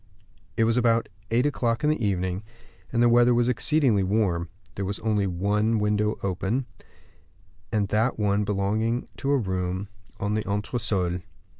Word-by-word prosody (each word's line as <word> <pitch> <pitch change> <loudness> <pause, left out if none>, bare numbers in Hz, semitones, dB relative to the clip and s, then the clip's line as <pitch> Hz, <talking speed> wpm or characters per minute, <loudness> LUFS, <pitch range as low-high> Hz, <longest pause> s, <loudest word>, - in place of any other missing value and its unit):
It - - +4
was 115 +1 +2
about 115 -1 +2 0.2
eight 120 +4 +2
o'clock 120 -3 0
in 150 - +3
the 155 -6 -2
evening, 95 -2 -1 0.5
and 120 0 +2
the - - +6
weather 120 +1 +5
was 120 0 +2
exceedingly 125 -3 +2
warm; 95 -4 0 0.2
there 100 - -4
was 100 +1 -2
only 105 -3 +1
one 105 +5 +1
window 105 0 +1
open, 100 +7 -1 1.1
and 105 -2 +1
that 110 +5 +1
one 105 -1 +1
belonging 105 +4 0
to 140 - -3
a 140 - +4
room 95 -2 -2 0.3
on 105 +1 -1
the 110 - +1
entresol. 100 -4 -1
105 Hz, 155 wpm, -26 LUFS, 100-120 Hz, 1.1 s, the